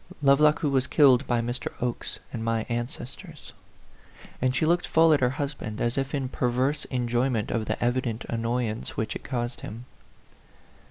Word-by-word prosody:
"Lovelock 150 +3 +5
who 150 - +1
was 130 -1 +2
killed 135 -3 +5
by 120 -1 +2
Mr. 120 +2 -3
Oke's 120 -1 -3 0.2
and 115 -2 -3
my 115 -1 0
ancestors." 135 +7 -6 0.9
And 130 0 +1
she 155 - +2
looked 175 +2 +2
full 165 0 +5
at 145 - +3
her 125 - +3
husband, 135 -5 -4
as 120 0 0
if 135 +1 -1
in 135 -2 -1
perverse 130 +4 0
enjoyment 120 -2 0
of 110 -2 -1
the 110 - -1
evident 120 -2 -1
annoy 115 +1 -1
ance 110 0 -4
which 110 - -2
it - - -6
caused 120 -2 -3
him. 115 +4 -8
125 Hz, 170 wpm, -26 LUFS, 120-140 Hz, 0.9 s, Lovelock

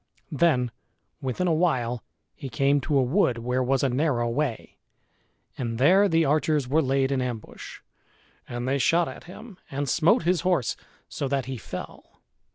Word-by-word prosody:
Then 130 -6 +2 0.5
within 135 +7 -2
a 170 - +2
while 125 -8 0 0.3
he 135 - -8
came 140 +4 +2
to 145 +2 0
a 135 - +4
wood 130 - +2
where 125 +2 -1
was 130 +1 +1
a 135 - +3
narrow 125 -2 +1
way; 125 0 -3 0.8
and 115 -3 -3
there 190 - +5
the 165 -1 +3
archers 150 -1 +1
were 150 +5 +3
laid 135 -1 +1
in 135 -2 0
ambush. 120 -3 -6 0.7
And 120 +1 -4
they 140 +1 +1
shot 170 +5 +3
at - - -9
him 195 +2 -12
and 140 +1 -3
smote 160 +6 +3
his 175 -1 +1
horse 175 -10 +1 0.3
so 140 - -4
that 135 -2 -1
he 130 0 -5
fell. - - -9
135 Hz, 165 wpm, -25 LUFS, 125-160 Hz, 0.8 s, there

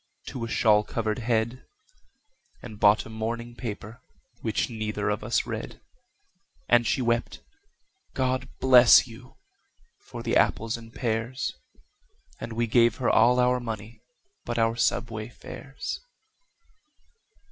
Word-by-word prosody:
to 125 - -6
a - - -3
shawl 105 -2 +3
covered 110 0 -2
head, 115 +1 -1 1.0
And 110 -4 -9
bought 105 +1 +4
a - - -10
morning 115 +2 -4
paper, 115 0 -7 0.4
which 110 -2 -1
neither 105 -3 -2
of 105 +1 -3
us 115 +2 0
read; - - -6 0.9
And 120 -1 +4
she 130 - +1
wept, 115 0 -1 0.7
"God 130 0 -1
bless 125 -2 +7
you!" 125 +1 -14 0.6
for - - -9
the - - 0
apples 115 +1 +2
and 115 -1 -11
pears, 115 +2 -2 0.9
And 115 - -6
we 120 +1 0
gave 115 +1 +3
her 125 - +1
all 120 +3 +4
our 125 0 +3
money 115 -2 -7 0.4
but 120 - -4
our 115 0 +2
subway 115 -2 -1
fares. 135 +2 -7
115 Hz, 125 wpm, -26 LUFS, 110-120 Hz, 1.0 s, bless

